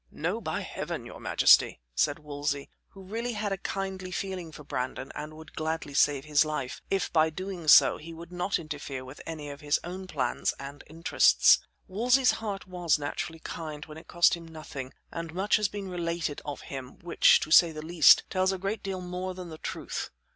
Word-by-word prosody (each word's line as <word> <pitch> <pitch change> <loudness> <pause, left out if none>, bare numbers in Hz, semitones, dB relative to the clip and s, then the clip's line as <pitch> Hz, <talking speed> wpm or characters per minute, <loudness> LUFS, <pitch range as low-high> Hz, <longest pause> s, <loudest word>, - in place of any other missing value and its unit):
"No! - - -3
by - - -2
heaven! - - -5
your - - -10
majesty," - - +5
said 145 - +1
Wolsey, 145 -2 -3 0.2
who 195 - -14
really 230 +5 -3
had 210 -1 -2
a 195 - -1
kindly 190 -2 -4
feeling 185 -2 -4
for 150 - -11
Brandon 130 -1 -4
and 150 +1 -7
would 160 0 -13
gladly 160 -2 -3
save 140 -1 +3
his 150 0 +4
life, 150 -4 -4
if, 195 -2 -1
by 160 -1 +5
so - - -2
doing, 180 0 -6 0.3
he 165 +2 -9
would 165 +1 -10
not 180 +2 0
interfere 145 -4 -6
with 130 +3 -10
any 155 -3 -5
of 140 - -10
his 145 0 +1
own 185 +2 -6
plans 130 -8 -1
and 140 +1 -9
interests. 165 +2 +5 0.3
Wolsey's 245 +6 +3
heart 200 -3 -4
was 175 -4 +1
naturally 150 +2 -4
kind 155 -2 -6
when 155 0 -10
it - - -17
cost 175 0 +4
him 170 -1 -5
nothing, 150 -5 -8 0.2
and 165 0 -6
much 195 +3 +3
has 210 -1 +1
been 200 0 -6
related 170 -4 -3
of 145 -1 -6
him, 135 -2 -8
which, 175 - +5
to - - -4
say 170 0 +8
the 155 0 -7
least, 165 -2 +7
tells 185 0 +2
a 190 - -2
great 195 +3 -3
deal 190 -2 -4
more 180 +1 -4
than 180 -2 -7
the 160 -1 -9
truth. - - -4
165 Hz, 200 wpm, -28 LUFS, 150-185 Hz, 0.3 s, say